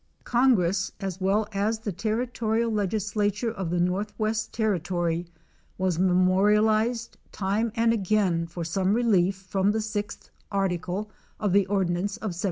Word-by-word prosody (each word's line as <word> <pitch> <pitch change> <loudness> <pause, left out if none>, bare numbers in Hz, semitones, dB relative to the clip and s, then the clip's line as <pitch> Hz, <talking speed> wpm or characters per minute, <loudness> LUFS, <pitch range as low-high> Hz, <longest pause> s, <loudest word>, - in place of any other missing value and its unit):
Congress, 200 -7 +2
as 190 -2 -5
well 205 +3 +2
as 210 +2 0
the 220 -1 -4
territorial 225 +3 -1
legislature 210 +2 0
of 190 -6 -4
the 175 +1 0
northwest 210 +4 -1
ter 220 -3 +1
ritory, 175 -1 -2 0.5
was 185 -3 0
memorialized 210 +5 +2
time 210 +4 -1
and 230 0 +3
again 190 -5 +1
for 170 0 -6
some 190 +4 +1
relief 200 -6 +3
from 190 +1 -1
the 215 - +1
6th 210 -1 -4 0.2
article 195 +1 -2 0.3
of 205 -4 0
the 200 -1 +4
ordinance 190 +1 0
of 220 -2 -4
1787. 170 - -9
200 Hz, 140 wpm, -26 LUFS, 185-220 Hz, 0.5 s, the